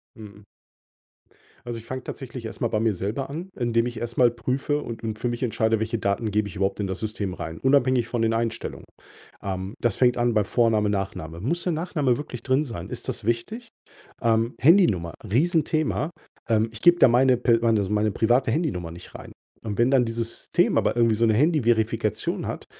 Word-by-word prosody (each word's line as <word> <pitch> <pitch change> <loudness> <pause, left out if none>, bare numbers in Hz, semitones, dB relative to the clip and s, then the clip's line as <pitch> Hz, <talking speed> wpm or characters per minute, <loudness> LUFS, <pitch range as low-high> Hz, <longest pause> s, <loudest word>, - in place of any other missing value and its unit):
Mhm. 105 -2 -12 1.2
Also, 120 -1 -5
ich 115 - -13
fange 130 +1 -5
tatsächlich 130 -3 -7
erst 110 - -7
mal - - +2
bei 110 - -1
mir 110 -2 +2
selber 105 +10 -3
an, 165 +6 -6
indem 120 -2 +1
ich 120 -1 -5
erst 120 0 -5
mal 125 -1 +6
prüfe 130 +5 -2
und 115 -1 -7
und 110 -1 -3
für 120 - -1
mich 120 +2 -3
entscheide, 110 -1 +1
welche 110 +1 -1
Daten 100 +2 -1
gebe 105 0 +1
ich 85 - -11
überhaupt 95 +2 -1
in 100 - -1
das 95 0 -4
System 105 -3 -3
rein, 80 -2 -6
unabhängig 130 -3 +3
von 120 - -1
den 115 0 +2
Einstellungen. 115 0 -3 0.6
Ähm, 95 0 -4
das 120 -4 +1
fängt 125 -1 +3
an 120 0 +2
bei 105 -1 +3
Vorname, 110 -2 +2
Nachname. 95 -5 -4
Muss 160 - -1
der 180 - 0
Nachname 155 -6 0
wirklich 125 -5 -7
drin 135 +4 +1
sein? 105 -9 -7
Ist - - -7
das - - -4
wichtig? 215 - -2 0.5
Ähm, 115 0 +1
Handynummer, 115 - +4
riesen 155 - +2
Thema. 155 0 -1 0.4
Ähm, 110 0 +2
ich 110 - -10
gebe 175 0 +5
da - - +8
meine 125 +1 +4
pe 120 -2 +3
meine 115 -3 +3
meine 105 0 +1
private 120 +4 +2
Handynummer 115 - -2
nicht 85 +2 -12
rein. - - -10 0.3
Und 105 -2 -3
wenn 120 +2 +3
dann 135 -2 +5
dieses 115 0 -4
Thema - - +3
aber - - 0
irgendwie 115 -2 +4
so 115 - 0
'ne 110 - +3
Handyverifikation 115 - +1
hat, - - -5
115 Hz, 205 wpm, -24 LUFS, 105-130 Hz, 1.2 s, da